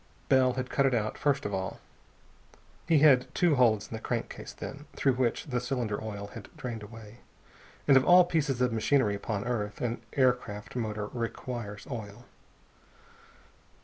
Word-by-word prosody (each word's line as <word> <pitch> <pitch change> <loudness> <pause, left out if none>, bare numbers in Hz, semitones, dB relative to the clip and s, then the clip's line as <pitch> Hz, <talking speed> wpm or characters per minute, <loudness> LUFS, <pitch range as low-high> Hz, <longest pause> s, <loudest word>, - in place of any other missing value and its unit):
Bell 130 -1 +4
had 130 0 -4
cut 140 -1 +3
it 130 - +2
out, 110 -1 -1
first 140 -2 0
of 100 - -3
all. 95 0 -3 1.1
He 165 -2 +5
had 130 -4 +6
two 175 -3 +3
holes 115 -6 +3
in - - -10
the 110 - -5
crankcase, 120 -1 -4
then, 145 +2 -8
through 135 - +2
which 125 -1 0
the 125 -5 -2
cylinder 120 -5 -2
oil 100 -2 -6
had 115 -4 -9
drained 120 -3 -5
away. 110 +1 -11 0.7
And 140 - +7
of 130 - +6
all 180 +2 +7
pieces 150 -7 0
of 125 -2 +2
machinery 115 -1 +2
upon 100 0 -3
earth, 105 -4 -2
an 120 -1 -2
aircraft 125 -6 0
motor 105 -3 -2
requires 115 -2 -5
oil. 110 -2 -7
120 Hz, 160 wpm, -29 LUFS, 105-130 Hz, 1.1 s, And